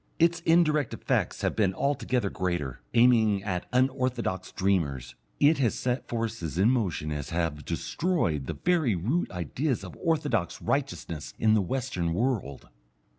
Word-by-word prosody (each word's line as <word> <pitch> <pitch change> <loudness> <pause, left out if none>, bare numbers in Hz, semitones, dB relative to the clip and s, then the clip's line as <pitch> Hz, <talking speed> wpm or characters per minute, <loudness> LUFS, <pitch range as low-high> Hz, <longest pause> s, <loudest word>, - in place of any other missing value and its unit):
Its 170 +1 +3
indirect 155 -5 +3
effects - - -1
have - - 0
been 95 -4 +1
altogether 125 -6 0
greater. 85 -8 -2
Aiming 110 -4 +4
at 90 -4 -3
unorthodox 125 -7 0
dreamers, 70 -11 0 0.3
it 145 +1 +5
has 120 -5 +2
set 125 0 0
such - - -29
forces 115 - -3
in 100 +6 +4
motion 90 -11 -1
as 75 -2 -4
have 80 -3 -2
destroyed 85 - -1
the - - -3
very 165 - +1
root 120 - 0
ideas 110 - -2
of 90 - -9
orthodox 150 - 0
righteousness 75 -3 -3
in 110 -1 +3
the 110 - +4
western 90 -6 -2
world. 105 - -2
110 Hz, 145 wpm, -28 LUFS, 85-130 Hz, 0.3 s, it